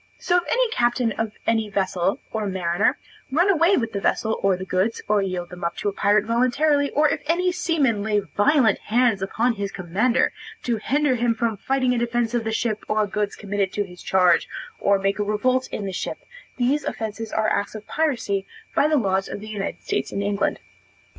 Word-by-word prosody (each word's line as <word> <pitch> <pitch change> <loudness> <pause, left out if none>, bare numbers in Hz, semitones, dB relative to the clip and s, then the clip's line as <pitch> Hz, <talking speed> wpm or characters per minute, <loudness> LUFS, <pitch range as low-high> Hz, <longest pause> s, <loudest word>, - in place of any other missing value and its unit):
So 355 - +1
if 355 - +1
any - - +3
captain 240 - +1
of 220 -1 -3
any 225 -2 +1
vessel, 190 0 0
or 215 -2 -2
mariner, 180 0 +1 0.3
run 345 +8 +4
away 350 +2 +4
with 230 -2 -1
the 200 - -2
vessel, 220 +2 0
or 195 -2 +2
the 185 - -6
goods, 190 +5 0
or 210 -1 +3
yield 185 -2 -3
them 180 -1 -9
up 170 - -2
to 205 - -1
a - - -6
pirate 205 +1 +2
voluntarily, 280 +5 +2
or 300 +2 +3
if - - -1
any 360 +3 +2
seaman 320 - +1
lay 210 0 +1
violent 220 +3 +2
hands 230 -3 +1
on 240 +2 +3
his 200 -2 -4
commander, 210 +8 +1 0.3
to 235 -2 0
hinder 285 +5 +1
him 235 -1 +1
from 225 -1 0
fighting 255 +4 0
in 240 - 0
defence 240 0 0
of 235 -2 0
the 225 - -1
ship 220 -1 -1
or 215 0 +2
goods 205 0 -2
committed 200 -2 -2
to 205 - 0
his 180 -2 -12
charge, 180 -3 +3 0.3
or 200 0 +3
make 195 +1 -1
a - - +2
revolt 255 +5 0
in 205 - -4
the 195 - -3
ship, 175 - -3 0.4
these 260 +4 +1
offences 220 0 -4
are 220 0 +1
acts 205 +2 -1
of 215 -1 -8
piracy, 235 -11 -1 0.3
by 285 - +3
the 305 -1 +3
laws 195 -5 0
of - - -5
the 215 +1 -9
United 205 -2 -4
States 135 - -2
and 200 - -2
England. 200 0 0
220 Hz, 205 wpm, -23 LUFS, 200-255 Hz, 0.4 s, run